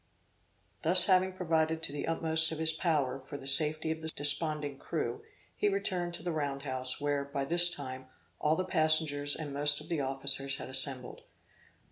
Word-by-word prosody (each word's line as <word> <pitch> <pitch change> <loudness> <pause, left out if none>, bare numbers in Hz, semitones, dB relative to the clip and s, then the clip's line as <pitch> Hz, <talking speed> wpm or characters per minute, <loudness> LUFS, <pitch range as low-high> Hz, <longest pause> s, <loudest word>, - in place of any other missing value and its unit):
Having 185 +2 +5
thus 185 - -20
provided 160 -2 -1
to - - 0
the 145 - -6
utmost 160 0 +2
of 160 - -5
his 160 0 +1
power, 155 -6 -2
for 145 - -8
the 135 - -13
safety 155 +3 +6
of 160 0 -6
the 160 - -7
desponding 145 -1 -1
crew, - - -5 0.3
he 415 - 0
returned 180 - -4
to - - -11
the 175 - -3
round 140 -3 -4
house, 130 -2 -4
where, 145 -1 -2
by 140 0 -5
this 175 +3 +4
time, 130 -6 -8 0.3
all 150 +1 0
the 185 - -3
passengers, 155 -4 +2
and 150 -3 -6
most 145 +1 +2
of 150 - -13
the 165 -4 -2
officers 135 0 -2
had - - -9
assembled. 130 -1 0
155 Hz, 180 wpm, -29 LUFS, 140-165 Hz, 0.3 s, safety